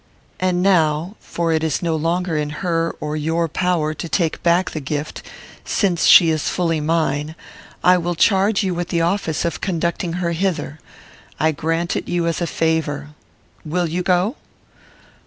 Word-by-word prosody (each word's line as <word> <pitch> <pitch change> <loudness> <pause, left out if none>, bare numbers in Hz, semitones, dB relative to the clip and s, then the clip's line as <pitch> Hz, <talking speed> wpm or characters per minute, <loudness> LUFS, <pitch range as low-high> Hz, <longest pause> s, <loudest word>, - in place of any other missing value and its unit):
"And 180 -1 +1
now, 170 -1 +2
for 170 -1 -2
it 160 0 0
is 160 +1 -1
no 165 -2 0
longer 165 +2 -1
in 150 -1 -1 0.2
her 165 -1 0
or 150 0 -3
your 165 +2 0
power 165 -2 0
to 160 +2 -6
take 165 -3 0
back 175 +2 +2
the 155 - -4
gift, 145 +1 -4 0.4
since 180 -6 +1
she 165 -2 +8
is 155 -1 -1
fully 165 -3 0
mine, 155 -1 0 0.5
I 180 0 +5
will 175 0 -2
charge 200 +4 +3
you 190 -2 0
with 175 0 -3
the 170 -2 0
office 170 -2 0
of 170 - -3
conducting 170 -1 -1
her 175 -1 -1
hither. 170 -4 -2 0.6
I 160 +2 +3
grant 165 +3 -1
it - - -3
you 175 -1 0
as 170 +1 -1
a 170 - 0
favour. 155 -3 -1 0.5
Will 175 +3 -1
you 170 +2 -2
go?" 185 - +1
170 Hz, 170 wpm, -20 LUFS, 160-180 Hz, 0.6 s, she